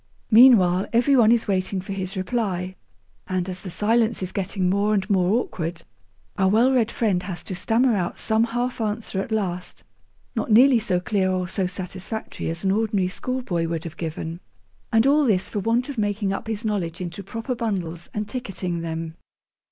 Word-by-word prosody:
Meanwhile, 210 -6 +6
every 245 +4 +4
one 230 -3 +6
is 235 -1 +2
waiting 190 0 0
for 190 +2 -6
his 190 0 -4
reply, 185 -2 -2 0.5
and, 185 -1 -1
as 185 -1 -5
the 190 - -7
silence 220 +3 +1
is 185 - -4
getting 190 -1 -1
more 200 +3 +2
and 195 -1 0
more 190 +4 +3
awkward, 165 -2 -5 0.6
our 190 -1 +4
well 230 +6 +4
read 240 -4 +2
friend 205 -7 0
has 180 -2 -6
to - - -6
stammer 230 +6 +2
out 180 -3 -2
some 220 +1 +2
half 240 +1 -2
answer 215 -2 -2
at 210 - -7
last, 185 -5 -3 0.5
not - - -2
nearly 245 +3 +6
so 195 -5 0
clear 190 0 0
or 185 -1 -1
so 190 0 -1
satisfactory 185 +3 -5
as 165 +2 -4
an 190 - +2
ordinary 205 -3 +1
schoolboy 190 -7 -2
would 165 -1 -3
have 165 -1 -7
given. 165 0 -5 0.5
And 225 +1 +4
all 295 +2 +4
this 200 -7 +1
for 210 - -1
want 230 +5 +1
of 280 -5 -5
making 205 -1 0
up 195 - -5
his 220 0 -3
knowledge 190 -6 -2
into 175 +1 -5
proper 225 +6 -4
bundles 185 -8 -3
and 210 0 -3
ticketing 195 -7 -4
them. 165 -1 -4
195 Hz, 185 wpm, -23 LUFS, 180-225 Hz, 0.6 s, Meanwhile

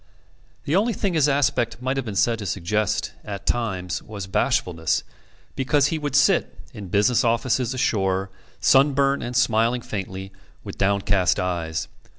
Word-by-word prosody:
The 150 - 0
only 220 +5 +2
thing 195 -1 -1
his 150 -3 +3
aspect 135 -5 +1
might 130 +2 -1
have 135 -3 -3
been 105 - -4
said 115 +3 +2
to 105 - -5
suggest, 100 +3 -1
at 100 -1 -7
times, 95 -7 -2
was 105 -3 -7
bashfulness; 80 -3 0 0.5
because 140 +2 +2
he 160 - -1
would 145 -3 -3
sit, 140 - +3 0.2
in 100 -2 -8
business 105 +7 +2
offices 120 +2 +1
ashore, 95 -6 0 0.3
sunburnt 140 0 +3
and 120 +1 -5
smiling 120 0 +2
faintly, 95 -2 -6 0.3
with - - -9
downcast 100 -1 +2
eyes. 85 -3 -2
115 Hz, 150 wpm, -23 LUFS, 95-135 Hz, 0.5 s, his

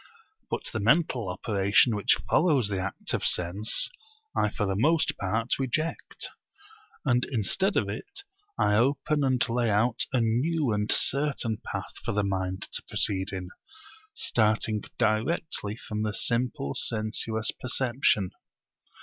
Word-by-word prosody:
But - - -3
the 110 - -1
mental 120 - +2
operation 100 +4 +2
which 105 - +3
follows 145 - +3
the 100 -2 -2
act 95 +1 -3
of - - -1
sense 90 +6 +2 0.5
I 105 - +2
for 105 - -2
the 95 -1 -1
most 155 +10 +2
part 110 +7 -1
reject; 155 +5 -2 0.8
and 125 -3 +3
instead 165 - +1
of - - +1
it 400 -1 -6 0.3
I 105 - +2
open 140 +6 +2
and 130 -2 +2
lay 120 -1 0
out 110 +3 +1
a 130 - +2
new 130 +5 +1
and 105 +1 0
certain 140 -6 +2
path - - -6
for - - -2
the 105 0 +1
mind 95 -1 -2
to - - -2
proceed 95 0 0
in, 95 -2 -5 0.7
starting 110 - +1 0.2
directly 110 0 0
from 105 -3 -5
the 110 -1 -1
simple 115 - 0
sensuous 110 0 -1
perception. 120 -6 +1
110 Hz, 135 wpm, -27 LUFS, 105-130 Hz, 0.8 s, which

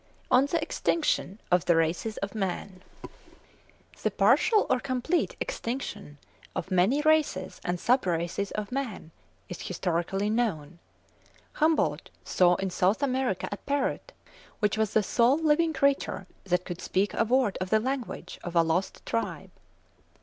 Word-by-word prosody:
ON 265 +3 +5
THE 335 +3 0
EXTINCTION 295 - 0
OF 180 -1 +3
THE 170 - +4
RACES 165 +7 0
OF 200 - -13
MAN. 190 -2 -4 1.2
The - - +1
partial 430 -3 +4
or 255 - +2
complete 260 +7 -1
extinction 240 - -4 0.4
of 190 - -4
many 190 +11 +3
races 310 -12 +1
and 175 0 -2
sub 250 0 +2
races 175 +3 -1
of 210 +1 -5
man 250 -11 -4 0.4
is 180 - -7
historically 185 +2 -1
known. 175 -9 -1 0.7
Humboldt 315 +1 +1
saw 180 -1 +3
in 190 +1 -3
South 190 +9 +1
America 255 -7 0
a 205 - -3
parrot 285 - -2 0.5
which 210 -2 +1
was 220 -2 0
the 220 - +3
sole 240 +7 +3
living 320 +1 +2
creature 280 -8 0 0.2
that 180 -1 0
could 175 -1 -6
speak 200 +2 0
a - - +2
word 240 -2 +1
of 185 - -2
the 220 - +4
language 255 +1 -4
of 175 0 -6
a 170 - +6
lost 165 +4 -1
tribe. 230 - -3
210 Hz, 145 wpm, -28 LUFS, 180-265 Hz, 1.2 s, a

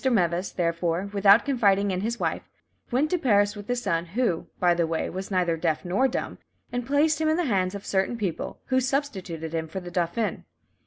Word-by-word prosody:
Meves, 185 -7 +1
therefore, 170 +2 -1
without 200 +2 +6
confiding 205 -7 +2
in 185 0 -1
his 230 +3 -2
wife, - - -2 0.4
went 275 +5 +1
to 360 - +1
Paris 205 -6 +3
with 205 -1 -9
his 245 0 -1
son, 170 -3 0
who, 190 -2 -1
by 175 -1 +4
the 170 -1 +1
way, 165 0 -2
was 190 +1 -5
neither 180 -4 +1
deaf 160 +1 -1
nor 195 +10 +2
dumb, 260 - -4 0.3
and 245 -1 -3
placed 300 +3 +2
him 315 - +2
in 315 - +2
the 355 - +1
hands 190 -5 0
of 200 - -7
certain 195 +4 0
people, 190 -7 -3
who 260 0 +3
substituted 190 - -3
him 160 -1 -2
for 175 +4 -5
the 175 -1 -9
dauphin. 175 +5 -1
195 Hz, 205 wpm, -26 LUFS, 175-245 Hz, 0.4 s, without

